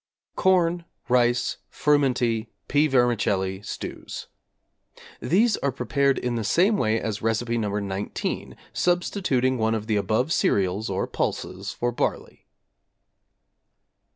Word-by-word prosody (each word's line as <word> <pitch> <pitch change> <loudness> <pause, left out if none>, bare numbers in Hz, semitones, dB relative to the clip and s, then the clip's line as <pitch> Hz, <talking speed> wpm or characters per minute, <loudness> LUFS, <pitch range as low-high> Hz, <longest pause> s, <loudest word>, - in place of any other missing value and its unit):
=Corn, 175 -2 +2 0.2
Rice, 120 -1 +2
Frumenty, 125 -6 +1 0.2
Pea 150 +1 +3
Vermicelli 105 -7 +1
Stews= 100 - -7 0.9
These 210 +6 +3
are 140 - 0
prepared 135 +2 +1
in 125 -1 -2
the 115 -2 -2
same 180 - +3
way 110 - +1
as 110 -2 -3
Recipe 115 +1 0
No. 105 -2 -1
19, 100 0 -4 0.2
substituting 175 - +1
one 110 0 +2
of 110 -1 -3
the 110 -2 +1
above 110 +9 +1
cereals 100 +2 +1
or - - -1
pulses 95 +2 -3
for 120 0 -2
barley. 120 - -3
120 Hz, 115 wpm, -25 LUFS, 110-145 Hz, 0.9 s, Pea